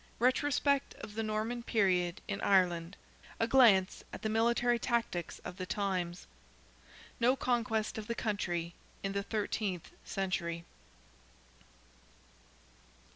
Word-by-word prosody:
RETROSPECT 280 +3 +2
OF 205 - -9
THE 225 - -2
NORMAN 220 +2 -2
PERIOD 185 -6 +1
IN 200 - -3
IRELAND—A 180 +3 0
GLANCE 225 -7 +5
AT - - -8
THE 220 - 0
MILITARY 235 +2 +2
TACTICS 230 -9 -1
OF 180 - -6
THE 185 -1 -4
TIMES—NO 195 +6 -3
CONQUEST 230 -4 0
OF 215 - -7
THE 235 - -2
COUNTRY 175 -7 -2 0.3
IN 195 - -1
THE 200 0 -1
THIRTEENTH 200 -3 -2
CENTURY. 170 -3 -2
210 Hz, 105 wpm, -33 LUFS, 185-235 Hz, 0.3 s, GLANCE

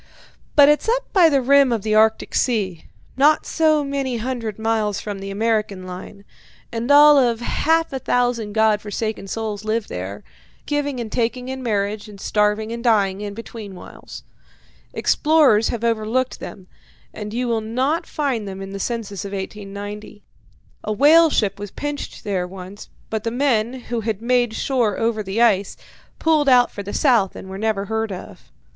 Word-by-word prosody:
But 285 -1 +8
it's 300 +8 +2
up - - -1
by 355 -4 +6
the 275 -3 +2
rim 280 0 +5
of 225 -4 -1
the 215 - 0
Arctic 220 +1 +3
Sea, 200 -9 0 0.3
not 295 +3 +4
so 310 -2 +2
many 275 -3 -2
hundred 230 -3 -4
miles 220 -2 0
from 205 -2 -6
the 195 0 -6
American 210 -2 -1
line, 185 +2 -9 0.5
and 235 +2 -3
all 290 0 +8
of 240 -3 +2
half 325 +5 +1
a 265 - -2
thousand 245 -5 0
God 220 -1 +3
forsaken 215 -1 -4
souls 215 0 -4
live 215 0 -2
there, 95 +3 -6 0.4
giving 285 -3 -2
and 225 -3 -5
taking 250 +1 -1
in 265 0 -5
marriage, 210 -2 -2
and 200 -1 -12
starving 210 +2 0
and 235 0 -5
dying 205 -5 +2
in 205 -1 -5
between 220 -3 -9
whiles. - - -11 0.7
Explorers 295 -9 +3
have 235 -1 -3
overlooked 230 +3 0
them, 190 - -9 0.5
and 210 -1 -6
you 245 +2 -2
will 230 -2 0
not 260 +9 -1
find 260 -8 -2
them 190 0 -7
in 195 0 -7
the 195 - -6
census 210 -3 -4
of 200 0 -7
1890. 205 +1 -7 0.6
A - - -3
whale 310 +8 +6
ship 200 -7 0
was 205 0 -6
pinched 290 +7 -6
there 190 -4 -2
once, 190 +2 -10 0.2
but 220 -1 -2
the 230 - -1
men, 240 -2 +1
who 240 -1 -3
had 215 -2 -2
made 240 -1 +1
shore 240 -7 0
over 225 -1 0
the 205 +3 0
ice, 200 -4 +2 0.4
pulled 310 -3 +2
out 245 -1 +5
for 205 - -6
the 200 0 -7
south 235 - +2
and 190 - -9
were 190 - -6
never 215 -2 -1
heard 220 +1 -2
of. 185 - -10
225 Hz, 175 wpm, -21 LUFS, 205-255 Hz, 0.7 s, But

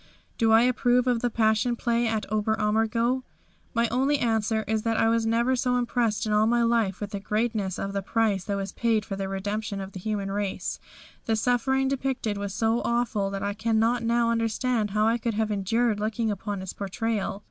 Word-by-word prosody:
Do 225 -2 +3
I 225 +1 +6
approve 250 0 +2
of 245 -2 +2
the 245 +1 0
Passion 220 +1 +2
Play 235 0 0
at 220 -2 -1
Ober 215 0 +1
Ammergau? 225 +4 +1 0.5
My 230 0 +3
only 270 +5 +2
answer 220 -3 0
is 220 0 0
that 225 0 0
I - - +3
was 230 0 +1
never 235 +3 +2
so 250 0 +1
impressed 240 -3 0
in 215 - 0
all 210 +1 +4
my 240 +1 +3
life 230 -5 +1
with 205 -1 -5
the 200 - -3
greatness 210 -2 -1
of 195 0 -4
the 200 - -1
price 205 -1 0
that 200 -1 -2
was 195 -1 -4
paid 225 -3 0
for 195 - -4
the 195 0 -4
redemption 205 +1 -3
of 195 0 -6
the 190 - -8
human 200 0 -3
race. 200 -1 -3 0.5
The 225 - +1
suffering 255 +4 +1
depicted 265 -5 -1
was 200 -1 -3
so 225 +3 +1
awful 235 -4 0
that 195 0 -4
I 200 0 -1
cannot 225 +2 +1
now 235 0 +2
understand 230 0 0
how 210 +2 +1
I 230 +2 +2
could 230 -1 -2
have 215 0 0
endured 210 +2 +1
looking 220 +1 -1
upon 200 -1 -4
its 190 - -6
portrayal. 200 0 -2
225 Hz, 205 wpm, -26 LUFS, 205-235 Hz, 0.5 s, I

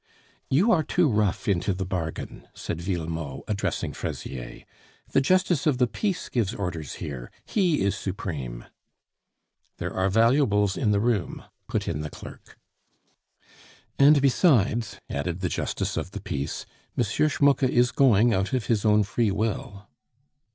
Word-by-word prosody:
"You 180 - +4
are 170 - +4
too 175 +2 +2
rough 105 -6 0
into 95 0 +1
the 95 0 -3
bargain," 85 -4 -5
said 85 - -5
Villemot, 80 -6 -4
addressing 100 -2 -2
Fraisier. 65 -3 -6 0.5
"The 135 - +4
justice 180 0 +2
of 145 -4 +3
the 125 - +4
peace 190 - -2
gives 115 -2 -1
orders 85 - -4
here; 65 -5 -6 0.2
he 180 -7 +1
is 100 +1 +1
supreme." 75 -12 -5 1.1
"There - - -4
are 95 +1 +1
valuables 115 -2 +3
in 115 - 0
the 105 -1 +3
room," 110 -3 -1 0.2
put - - -2
in 75 - -2
the 75 - -4
clerk. - - -12 1.4
"And 145 +1 +7
besides," 120 - +3
added 85 +5 -3
the 90 - 0
justice - - -2
of - - -3
the 105 - -4
peace, 70 -7 -4 0.3
"M. 120 - +3
Schmucke 140 +5 +2
is 125 0 +3
going 120 -3 +4
out 95 +6 0
of 125 -3 0
his 110 -4 +1
own 105 -1 +4
free 115 +1 0
will." 100 -1 -3
105 Hz, 145 wpm, -26 LUFS, 90-130 Hz, 1.4 s, And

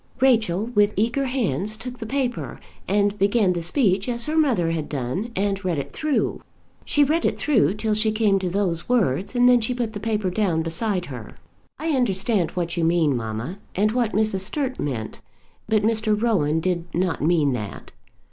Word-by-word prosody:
Rachel 220 -7 +2
with 210 -1 +3
eager 235 +7 +1
hands 215 - -1
took 245 +2 -8
the 225 - -6
paper, 255 -1 -2 0.3
and 205 +1 +1
began 200 -1 +3
the 175 - -3
speech 195 - +1
as 235 -1 +1
her 310 - -2
mother 240 - +2
had 160 -2 -3
done, 145 - -3
and 195 0 -1
read 180 -4 -1
it 140 - -5
through. 305 -3 -1 0.4
She 295 - +3
read 315 +4 +1
it - - 0
through 215 - +2
till 215 0 -1
she 215 +1 +1
came 215 -3 +2
to 185 -1 -2
those 180 -2 -2
words, 200 - +1
and 245 0 +5
then 245 -1 +5
she 245 +3 -1
put 235 -3 -2
the 205 - -5
paper 210 -3 -1
down 180 -5 0
beside 180 +3 -1
her. 125 -7 -8 0.5
"I 320 +3 -3
understand 210 - +1
what 170 -1 -2
you 170 - +1
mean, 165 -4 +2
mamma, 115 - -4 0.2
and 210 +3 +2
what 235 -2 0
Mrs. 215 -2 +1
Sturt 260 +7 -2
meant; 115 -7 -4 0.5
but 215 -2 +2
Mr. 220 -1 +1
Rowan 160 -9 +1
did 175 -1 -1
not 180 0 0
mean 155 -3 +2
that." 105 -5 -6
205 Hz, 185 wpm, -23 LUFS, 170-235 Hz, 0.5 s, and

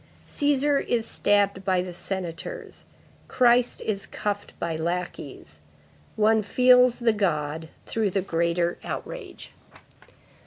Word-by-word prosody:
Cæsar 285 0 +2
is 230 -2 +1
stabbed 200 -3 +1
by 185 -2 +1
the 180 -1 -7
senators; 195 - -6 0.4
Christ 245 -1 +3
is 200 -2 -3
cuffed 205 -1 -4
by 165 - -2
lackeys. 170 +3 -5 0.6
One 220 0 +3
feels 250 +2 +5
the 235 -2 +2
God 160 -5 -1 0.2
through 220 -3 0
the 195 0 -1
greater 170 0 0
outrage." 460 -7 -7
205 Hz, 110 wpm, -25 LUFS, 175-245 Hz, 0.6 s, feels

